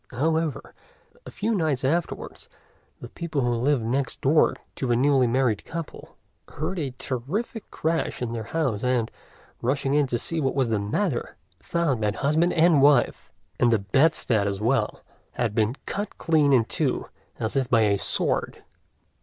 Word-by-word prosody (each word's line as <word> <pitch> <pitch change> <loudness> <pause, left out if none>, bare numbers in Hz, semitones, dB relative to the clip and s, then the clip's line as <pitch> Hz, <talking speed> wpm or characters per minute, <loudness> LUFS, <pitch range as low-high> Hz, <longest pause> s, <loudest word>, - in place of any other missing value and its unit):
However, 160 +3 -1 0.5
a - - -6
few 220 +2 -2
nights 155 - 0
afterwards 165 +5 -2 0.5
the 120 - -8
people 160 -2 -3
who 120 -1 +1
lived 125 +1 +1
next 130 +3 -2
door 150 +4 +3 0.2
to 130 - -3
the 120 - +2
newly 135 0 +3
married 120 -3 +1
couple 165 -1 -8 0.4
heard 165 +5 -3
a 135 -5 -4
terrific 175 - -4
crash 165 +1 -2
in 120 -2 -3
their 115 -2 -4
house, 130 -7 -1
and, 125 -3 0 0.5
rushing 135 +2 0
in 145 -1 +3
to 120 - -1
see 165 +7 -2
what 135 -2 0
was 130 -4 +1
the 110 -2 +1
matter, 120 - -2 0.2
found 150 -9 -1
that 105 -1 0
husband 155 +5 +2
and 165 -3 +4
wife, 140 -3 +3 0.3
and 120 - +4
the 115 - +4
bedstead 110 0 +2
as 100 -1 -2
well, 120 +6 0 0.3
had 120 -4 -1
been 110 +2 +1
cut 205 +1 -4
clean 155 -4 +2
in 125 -4 +4
two - - -1 0.3
as 110 +3 -3
if 130 -3 0
by 115 -2 +4
a 100 -2 +2
sword. - - 0
135 Hz, 165 wpm, -25 LUFS, 120-160 Hz, 0.5 s, and